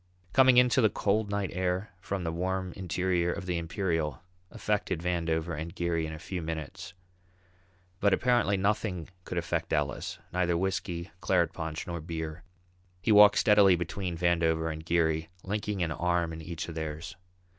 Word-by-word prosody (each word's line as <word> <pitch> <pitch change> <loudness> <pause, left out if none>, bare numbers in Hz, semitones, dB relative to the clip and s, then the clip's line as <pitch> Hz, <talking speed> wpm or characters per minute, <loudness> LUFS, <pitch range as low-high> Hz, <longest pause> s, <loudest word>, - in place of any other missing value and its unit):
Coming 130 -2 +6
out - - +10
into 125 +1 +3
the 110 - +5
cold 105 +1 0
night 100 -1 -1
air 90 +2 -1
from 100 -1 -3
the 80 - -1
warm 95 +1 -2
interior 90 -1 0
of 100 0 -5
the 90 -2 -1
Imperial 80 - -2 0.3
affected 105 -6 -1
Vandover 85 -1 -1
and 80 +2 -6
Geary 85 -2 0
in - - -6
a 80 - -6
few 90 +3 -5
minutes. 80 +1 -6 1.0
But 100 - +3
apparently 120 -2 +3
nothing 95 -3 -1 0.2
could 90 - -5
affect 85 -1 -2
Ellis, 75 -1 -1 0.2
neither 90 -1 +1
whisky, 90 -2 -2
claret 85 -4 +2
punch 80 -1 -4
nor 85 -2 -4
beer. 80 0 -5 0.6
He 110 - 0
walked 105 0 +8
steadily 105 -3 +6
between 90 +1 -3
Vandover 80 -2 +1
and 80 0 -8
Geary, 80 -1 +1
linking 105 -1 -2
an 80 - -1
arm 85 0 0
in 80 - -7
each 80 0 -5
of 85 - -6
theirs. 80 +2 -5
85 Hz, 165 wpm, -29 LUFS, 80-95 Hz, 1.0 s, out